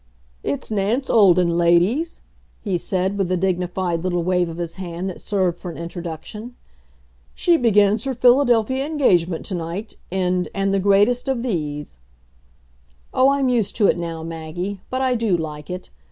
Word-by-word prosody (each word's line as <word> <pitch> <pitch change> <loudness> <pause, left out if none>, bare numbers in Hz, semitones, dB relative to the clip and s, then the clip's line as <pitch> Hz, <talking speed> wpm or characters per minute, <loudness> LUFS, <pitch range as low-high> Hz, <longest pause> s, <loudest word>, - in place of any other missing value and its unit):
"It's 140 - -4
Nance 220 +6 0
Olden, 180 -5 +4
ladies," 180 - +2 0.4
he 195 -4 -1
said, 190 +3 -1
with 185 -2 0
a 185 - +2
dignified 180 -1 -1
little 175 -2 0
wave 180 -1 +1
of 165 - -7
his 170 0 -5
hand 180 0 -5
that - - -10
served 185 -4 0
for 180 - -6
an 165 - -8
introduction. 175 +7 -7 0.8
"She 345 - +3
begins 210 -4 +3
her 265 -1 -2
Philadelphia 250 0 +3
engagement 185 - +1
to 195 - -5
night 175 +5 -5
in 180 -1 0
And 195 0 0
the 195 - +2
Greatest 205 +6 +3
of 260 -3 -1
These." 150 - -4 1.1
Oh, 260 +1 +5
I'm 275 -1 +2
used 240 -5 0
to 210 - +3
it - - +4
now, 165 -1 -4
Maggie, 165 +4 -5
but 260 +1 -1
I 260 -1 +2
do 225 -6 +1
like 150 -2 -6
it. 180 0 -6
190 Hz, 165 wpm, -21 LUFS, 170-230 Hz, 1.1 s, Oh